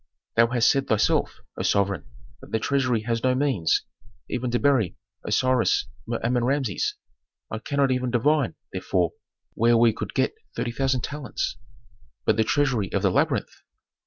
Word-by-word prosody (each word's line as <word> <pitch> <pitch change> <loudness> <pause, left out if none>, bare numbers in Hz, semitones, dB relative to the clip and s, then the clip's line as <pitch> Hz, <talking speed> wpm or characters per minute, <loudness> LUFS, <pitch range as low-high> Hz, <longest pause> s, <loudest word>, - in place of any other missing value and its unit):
"Thou 115 0 +5
hast 120 -1 +3
said 135 0 0
thyself, 110 -1 +1 0.2
O - - -2
sovereign, 100 -1 +1 0.4
that - - -13
the 110 - +2
treasury 125 0 +1
has 115 +1 -2
no 130 0 +3
means, 130 - +1 0.4
even 125 0 -2
to 120 - +1
bury 130 -9 +2 0.3
Osiris 125 -4 +2 0.2
Mer 115 0 -2
Amen 120 +1 +1
Rameses. 130 -5 0 0.6
I 110 - -3
cannot 140 +2 +1
even 125 -1 0
divine, 135 +3 +2 0.2
therefore, 90 -2 0 0.4
where 115 +1 +4
we 115 -1 +5
could - - -6
get - - +1 0.2
thirty 120 - -2
thousand 130 0 0
talents." 140 -4 -4 0.7
"But - - +3
the 110 - +3
treasury 125 -4 +1
of 100 - -1
the 95 - +3
labyrinth." - - 0
120 Hz, 160 wpm, -25 LUFS, 110-130 Hz, 0.7 s, Thou